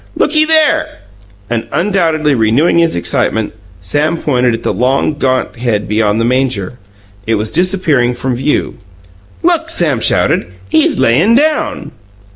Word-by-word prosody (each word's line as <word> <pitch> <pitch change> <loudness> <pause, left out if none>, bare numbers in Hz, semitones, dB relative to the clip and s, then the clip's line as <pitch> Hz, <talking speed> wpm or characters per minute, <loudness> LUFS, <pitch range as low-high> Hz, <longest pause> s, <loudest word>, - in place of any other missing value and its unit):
Looky 310 +1 +2
there!" 315 - +1 0.5
And 115 0 -3
undoubtedly 165 -6 +1
renewing 120 +9 +2
his 165 -1 +1
excitement, 105 +5 -1 0.3
Sam 145 - -1
pointed 125 -6 0
at 115 - -9
the - - -1
long, 130 +5 0
gaunt 130 -4 -1
head 115 -4 -2
beyond 105 0 0
the 115 - +1
manger. 125 -4 -1 0.5
It 115 - +1
was 105 +1 -2
disappearing 165 -9 +1
from 130 +1 -3
view. 135 +4 -2 0.7
"Look!" 330 -1 +1
Sam 160 - +1
shouted. 105 - +1 0.2
"He's 155 - +2
layin' 135 - +3
down!" 305 +3 0
130 Hz, 135 wpm, -13 LUFS, 115-170 Hz, 0.7 s, layin